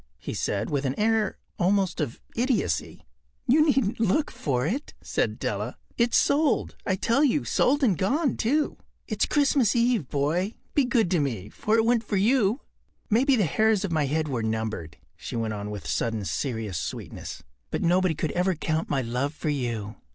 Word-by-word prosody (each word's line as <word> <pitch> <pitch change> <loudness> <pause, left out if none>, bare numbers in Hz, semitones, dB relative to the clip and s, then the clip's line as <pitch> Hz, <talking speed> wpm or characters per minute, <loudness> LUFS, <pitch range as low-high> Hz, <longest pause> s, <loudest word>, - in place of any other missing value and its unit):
” - - -38
he - - -6
said, - - -2
with 140 -1 0
an 135 +4 -2
air 220 -1 +1 0.2
almost 190 -1 +2
of 135 -6 -3 0.2
idiocy. 250 +1 -1 0.4
“You 285 +4 +5
needn’t 265 -8 +1
look 230 +8 +1
for 125 -4 -1
it,” 255 - -3
said - - -1
Della. - - -3 0.2
“It’s 235 0 +3
sold, 290 -2 +2
I 190 - +2
tell 235 +9 +2
you—sold 285 0 +2
and 210 -8 +4
gone, 270 - +1
too. 290 +7 0 0.3
It’s - - 0
Christmas 275 -6 +3
Eve, 235 - +2
boy. 160 +9 0 0.2
Be 285 - +3
good 235 -7 +2
to 175 - +3
me, 115 -9 -2
for 215 +1 0
it 225 - +3
went 235 -1 +3
for 205 - -1
you. 220 +3 +3 0.5
Maybe 260 +5 +4
the 215 - +2
hairs 215 +4 +2
of 185 - -4
my 155 -3 +1
head 155 +2 0
were 130 -5 -2
numbered,” 110 -8 -3 0.2
she - - -7
went 115 -2 -1
on 105 0 -5
with 105 -1 -6
sudden 110 -3 -1
serious 105 - -2
sweetness, - - -6 0.3
“but - - -2
nobody 180 0 +3
could 155 0 -2
ever 180 +1 +1
count 160 +1 -2
my 135 -2 0
love 125 +6 -2
for 155 - -3
you. 115 -7 -3
185 Hz, 180 wpm, -26 LUFS, -, 0.5 s, You